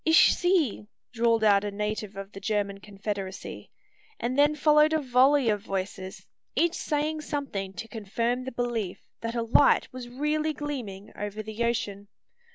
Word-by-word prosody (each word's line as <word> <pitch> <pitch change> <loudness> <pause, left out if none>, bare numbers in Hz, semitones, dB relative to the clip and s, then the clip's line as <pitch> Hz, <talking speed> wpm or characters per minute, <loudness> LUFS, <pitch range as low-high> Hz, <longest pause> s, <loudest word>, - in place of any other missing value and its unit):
"Ich 320 0 +6
sehe!" 340 - +1 0.3
drawled 230 -1 +2
out 200 -2 +5
a 205 - -1
native 210 0 -3
of 195 0 -7
the 195 - -9
German 200 -1 -1
Confederacy; 200 -1 -6 0.5
and 240 +2 -1
then 290 +2 +4
followed 300 +1 +5
a 315 - +3
volley 265 0 +4
of 210 -2 +2
voices, 190 0 -5 0.3
each 340 0 +3
saying 305 -1 -1
something 270 -11 -4
to 210 +5 -6
confirm 230 +3 -2
the 260 - -4
belief 235 -6 -3 0.2
that 230 +1 -3
a 235 - 0
light 240 +4 +4
was 250 -1 -7
really 300 +4 0
gleaming 250 -10 -5
over 205 +1 -4
the 220 +2 -3
ocean. 205 -4 -2
230 Hz, 160 wpm, -27 LUFS, 205-285 Hz, 0.5 s, Ich